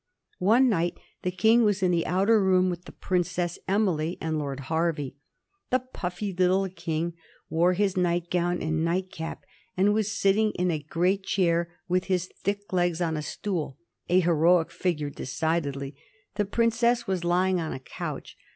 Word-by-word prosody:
One 225 +8 +5
night 175 -6 0 0.2
the 180 - -1
King 220 +6 +4
was 205 -3 +1
in 180 - +3
the 170 -2 +1
outer 200 +4 +3
room 185 -1 +3
with 175 0 -7
the - - -10
Princess 180 -1 -1
Emily 180 -5 +1
and 160 -1 -1
Lord 140 -2 -4
Hervey. 160 -1 -1 0.6
The 255 - +4
puffy 200 -6 -5
little 185 +2 +2
King 170 -1 -3 0.4
wore 175 +3 +3
his 195 0 +1
nightgown 175 0 0
and 160 0 0
nightcap, 170 -1 -3 0.3
and 200 +3 +4
was 215 -1 0
sitting 210 +2 +3
in 180 0 0
a 155 - -1
great 180 +6 0
chair 175 -3 0
with 180 0 +1
his 185 -2 0
thick 205 0 -3
legs 175 -2 +1
on 165 -2 0
a 155 - -2
stool; 155 -4 -4 0.3
a 180 +1 +5
heroic 170 0 +3
figure, 150 -6 -2
decidedly. 140 0 -2 0.4
The 205 - 0
princess 235 +3 +2
was 190 -4 -1
lying 180 +1 +2
on 160 - -3
a 130 - -5
couch. 130 - -7
180 Hz, 160 wpm, -27 LUFS, 165-195 Hz, 0.6 s, One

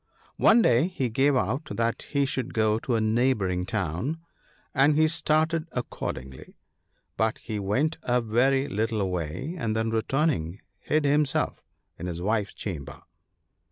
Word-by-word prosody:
One 230 +1 +6
day 125 +7 +4
he 135 -9 -2
gave 135 +4 +3
out 125 - 0
that 115 0 -2
he 140 -1 +1
should 130 -2 -3
go 110 -1 +2
to 120 +1 -1
a - - +2
neighbouring 110 -5 +1
town, 95 - -2 0.6
and 140 +3 +4
he 155 0 +5
started 160 +1 +1
accordingly; 65 - -6 0.6
but 110 0 +1
he 110 -3 -5
went 130 +12 0
a 125 -3 +1
very 125 +4 +2
little 110 -3 -1
way, 90 - -3
and 110 -4 -1
then 110 0 0
returning, 110 - 0 0.2
hid 155 -1 0
himself 145 -1 +1 0.4
in 90 - -4
his 85 -1 -4
wife's 105 +2 -1
chamber. 70 -8 -6
115 Hz, 145 wpm, -26 LUFS, 100-140 Hz, 0.6 s, One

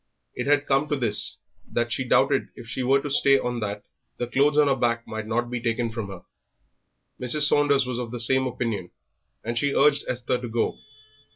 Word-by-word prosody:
It - - -4
had 145 0 +3
come 135 +2 +1
to 145 - +1
this, 115 -6 +3 0.3
that 120 0 -1
she 120 +4 -1
doubted 125 - +2
if 120 - -11
she 130 - -4
were 135 +2 +3
to 145 - -4
stay 140 0 +4
on 125 -2 -3
that 105 -1 -4 0.3
the 120 - -2
clothes 140 +4 +2
on 150 -1 +5
her 135 - +3
back 120 -2 0
might 110 -1 -5
not 120 +2 -1
be 125 -1 -3
taken 115 0 -1
from 110 -2 -5
her. 95 -3 -10 1.0
Mrs. 135 +4 +1
Saunders 145 -2 +3
was 125 -1 -3
of 120 -2 -4
the 120 +1 -6
same 130 +3 +2
opinion, 115 -7 -3 0.5
and 115 +1 -2
she 140 +1 0
urged 145 -1 +4
Esther 125 0 -2
to 120 - -5
go. 115 +1 -1
125 Hz, 205 wpm, -25 LUFS, 115-135 Hz, 1.0 s, on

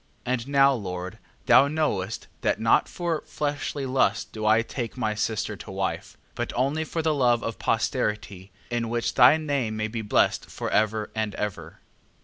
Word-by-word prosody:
8:9. 125 - 0
And 125 0 -3
now, 140 -1 +5
Lord, 90 -5 -5 0.3
thou 140 - +6
knowest, 130 -10 -1 0.2
that - - +1
not 115 0 +3
for 170 -3 -2
fleshly 145 -1 -3
lust 130 -6 +1
do 110 -1 -3
I 110 +1 +5
take 120 0 -5
my 110 -4 0
sister 110 0 -2
to - - -10
wife, - - -3 0.2
but - - -3
only 140 +6 +1
for 160 +1 -3
the 160 -1 +2
love 120 -4 +2
of 115 - -4
posterity, 100 -2 -1 0.2
in 120 -1 -1
which 120 0 -1
thy 125 +6 +7
name 140 -8 -2
may 110 0 -1
be 115 +1 -4
blessed 105 - +1
for - - -4
ever 110 0 +1
and 110 -2 -2
ever. 105 -2 -5
115 Hz, 175 wpm, -26 LUFS, 110-140 Hz, 0.3 s, thy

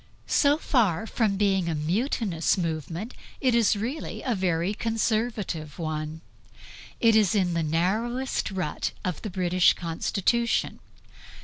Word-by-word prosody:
So 290 0 +3
far 220 - +1
from 215 -3 0
being 195 -4 +2
a 160 - -1
mutinous 180 - 0
movement, 165 - -3 0.3
it 255 -2 +2
is 230 -3 +4
really 240 +9 -4
a 250 - 0
very 185 -1 0
Conservative 220 -8 -2
one; 155 -1 -4 0.8
it 230 -2 +5
is 215 -2 +4
in 185 -4 +2
the 170 - 0
narrowest 215 - 0
rut 185 -6 -3
of 180 -4 -2
the 215 - -4
British 180 -1 +3
Constitution. 195 +7 0
195 Hz, 125 wpm, -26 LUFS, 165-225 Hz, 0.8 s, it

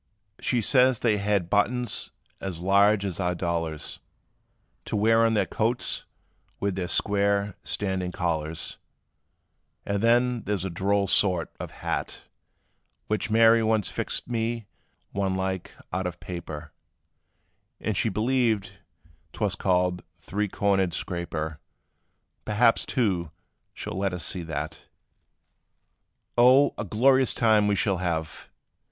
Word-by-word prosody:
"She 120 -2 0
says 130 0 +3
they 110 -3 +2
had 100 -3 0
buttons 120 +4 0 0.3
as 95 -4 -5
large 100 +2 +4
as 95 -3 -4
our 90 -2 0
dollars, 85 -3 -3 0.9
To - - -3
wear 115 +2 +4
on 115 -1 +3
their 100 -2 +2
coats 115 +6 0 0.5
with 100 -1 0
their 90 -1 -3
square, 100 +1 +1
standing 95 -3 -2
collars: 80 -3 -3 1.1
And 100 0 -1
then, 120 +1 +3
there 105 0 0
's 95 - -3
a 95 - -3
droll 100 +3 +1
sort, 90 -3 +3
of - - -5
hat, - - -4 0.9
Which 110 +1 -1
Mary 115 +1 +6
once 110 -2 +1
fixed - - -2
me 115 -1 -2 0.5
one 95 -1 -1
like, 95 -1 -2 0.2
out 95 0 -1
of 90 - -7
paper, 85 -4 -7 1.1
And - - -3
said - - -2
she 115 - +1
believed 110 -2 +1 0.6
't - - -12
was - - +1
called, 90 -1 +1 0.2
three 105 +1 -2
cornered 95 -3 +1
scraper; 80 -3 -4 0.8
Perhaps, 115 +2 +3
too, 95 - 0 0.4
she - - -8
'll - - -4
let 95 -1 0
us 85 -4 -4
see 90 - -3
that. 80 -3 -5 1.5
"Oh! 130 +4 +6
a - - -2
glorious 130 +3 +3
time 110 -3 +4
we 105 - +2
shall 100 -1 +1
have! 85 -3 -3
100 Hz, 135 wpm, -26 LUFS, 90-110 Hz, 1.5 s, Mary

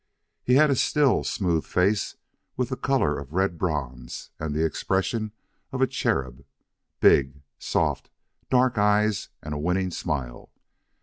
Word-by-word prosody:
He 125 - +3
had 150 +1 +5
a - - +3
still, 145 +1 +2
smooth 85 -6 0
face, 100 +3 +1 0.4
with 125 -1 -1
the 130 - -2
color 130 - +1
of 70 +1 -10
red 95 -2 0
bronze 65 -8 -4
and 75 -1 -3
the 80 +1 +2
expression 105 +6 -1 0.4
of 130 - -4
a 130 - +5
cherub; 65 - -2 0.6
big, 70 +1 +4 0.2
soft, - - -1 0.4
dark 125 -3 +3
eyes; 105 0 +2
and 75 - -5
a 75 - -3
winning 90 +4 0
smile. 65 -8 -4
95 Hz, 140 wpm, -25 LUFS, 75-115 Hz, 0.6 s, had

